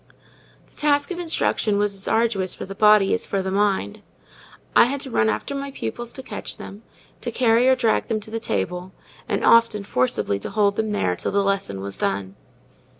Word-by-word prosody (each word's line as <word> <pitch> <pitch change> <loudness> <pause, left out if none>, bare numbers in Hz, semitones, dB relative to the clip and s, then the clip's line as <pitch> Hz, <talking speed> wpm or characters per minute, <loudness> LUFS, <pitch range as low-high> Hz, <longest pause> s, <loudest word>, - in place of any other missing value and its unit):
The - - -25
task 290 +1 +1
of 355 - -4
instruction 315 -10 +1
was 205 0 +1
as 195 0 -6
arduous 220 -5 +1
for - - -6
the 195 - -7
body 210 -1 +5
as - - -1
the 190 -1 -2
mind. 195 - 0 0.7
I - - +8
had 275 +3 -2
to 265 - -6
run 220 - +2
after 280 - -2
my 280 0 -4
pupils 240 -3 -5
to 265 - -7
catch 210 -5 -6
them, 200 +2 -10 0.4
to 240 - -2
carry 235 +1 +3
or 260 - +5
drag 235 -3 +1
them 225 -2 -1
to 215 - -11
the 225 - -2
table, 180 - -3 0.4
and - - 0
often 230 -3 +4
forcibly 125 - 0
to - - -6
hold 200 -1 +2
them 220 0 -1
there 90 - 0
till - - -3
the 200 0 +2
lesson 195 - -1
was 100 0 -6
done. 95 0 -2
210 Hz, 200 wpm, -23 LUFS, 190-235 Hz, 0.7 s, I